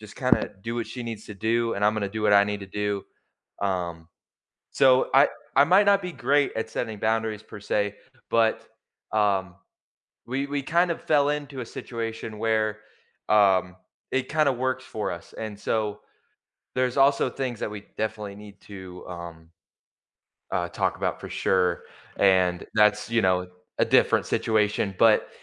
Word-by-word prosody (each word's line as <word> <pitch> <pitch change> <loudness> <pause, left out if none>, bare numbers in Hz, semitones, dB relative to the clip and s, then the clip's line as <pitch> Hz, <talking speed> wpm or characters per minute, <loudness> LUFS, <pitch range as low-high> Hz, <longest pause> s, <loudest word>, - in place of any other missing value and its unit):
just 105 -1 -12
kinda 130 -1 +2
do 115 +1 -4
what 115 - -2
she 125 - -7
needs 115 -2 -6
to 105 - -8
do 115 +3 0
and 105 - -1
I'm 105 - +4
gonna 100 -2 -1
do 110 0 -4
what 105 -1 +3
I 100 0 +7
need 105 0 -3
to 100 - -8
do, 105 0 -2 0.6
um, 85 -4 -2 0.6
so, 130 -1 +4
I 140 +2 +7 0.3
I 140 - +7
might 190 +6 +5
not 200 0 +5
be 180 - -4
great 145 0 +1
at 110 0 -3
setting 110 -2 -4
boundaries 110 -1 0
per 105 - -11
se, 105 0 -1 0.3
but, 115 -1 +2 0.5
um, 95 -4 +1 0.7
we 135 +3 -1
we 145 0 -2
kinda 170 +2 +2
fell 145 -2 +2
into 145 -2 -3
a - - -5
situation 115 -2 -6
where, 110 -1 0 0.5
um, 95 -3 +4 0.4
it 130 -1 -1
kinda 150 -2 +3
works 130 +1 -2
for 110 - -3
us, 85 - -9
and 105 -2 -6
so, 105 -2 -2 0.7
there's 125 0 0
also 140 +1 +4
things 130 -4 -4
that - - -2
we 105 -1 -7 0.2
definitely 105 -2 -3
need 105 -1 -13
to, 95 -3 -10
um, 85 -2 -9 1.0
uh, 85 - 0
talk - - -1
about - - -2
for - - -7
sure 90 -2 +1 0.3
and 95 -2 +3
that's, 105 0 +3
you 115 -1 +2
know, 90 -1 +2 0.3
a - - +4
different - - +3
situation, 105 -2 +1
but 110 -2 +5
110 Hz, 165 wpm, -25 LUFS, 100-125 Hz, 1.0 s, I